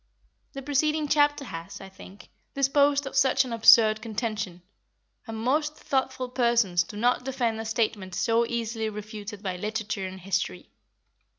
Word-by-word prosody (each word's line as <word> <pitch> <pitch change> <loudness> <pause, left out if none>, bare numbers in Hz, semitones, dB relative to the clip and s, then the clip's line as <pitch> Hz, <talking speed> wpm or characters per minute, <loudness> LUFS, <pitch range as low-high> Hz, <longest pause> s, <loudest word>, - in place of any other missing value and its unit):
The 275 -1 -7
preceding 300 +2 0
chapter 290 -1 +2
has, 165 -6 -8
I 195 - -10
think, 190 +1 -14 0.3
disposed 280 +1 +3
of 270 - -7
such 265 -1 +3
an 245 - -5
absurd 220 -1 +6
contention, 215 -5 -4 0.6
and 225 0 -6
most 295 +7 0
thoughtful 265 -1 -2
persons 235 -8 +2
do 190 +5 -7
not 245 +3 +1
defend 245 -4 -1
a 225 - -5
statement 215 -5 -2
so 230 +1 +2
easily 230 -2 -2
refuted 210 0 -8
by 185 -2 -3
literature 210 0 -3
and 190 0 -9
history. 185 - -3
225 Hz, 150 wpm, -26 LUFS, 205-265 Hz, 0.6 s, absurd